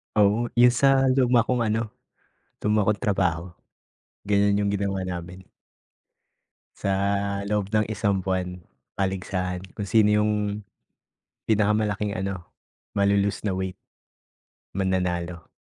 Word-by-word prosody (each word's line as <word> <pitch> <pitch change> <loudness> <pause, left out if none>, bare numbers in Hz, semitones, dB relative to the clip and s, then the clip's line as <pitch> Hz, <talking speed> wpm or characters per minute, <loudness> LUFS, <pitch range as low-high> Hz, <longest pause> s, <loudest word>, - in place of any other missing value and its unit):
Oo, 105 +3 +3
yung 120 0 +7
sa 135 +1 +4
luma 125 -3 +4
kong 120 -2 0
ano, 110 0 -1 0.7
luma 105 -1 +2
kong 105 -1 +1
trabaho. 90 -7 +1 0.8
Ganiyan 100 0 +2
yung 100 - +1
ginawa 100 -1 -1
namin. 90 +1 -6 1.3
Sa 100 - -2 0.6
loob 105 -1 -1
ng 105 -1 +2
isang 105 -2 0
buwan, 90 -1 -2 0.4
paligsahan 90 -1 -2
kung 105 - -3
sino 110 0 +4
yung 105 0 +2 1.1
pinakamalaking 105 -1 +1
ano, 95 -2 -4 0.5
malo-lose 100 0 +2
na 100 - +1
weight, 95 0 -3 1.0
mananalo. 90 -3 -1
100 Hz, 110 wpm, -25 LUFS, 95-105 Hz, 1.3 s, yung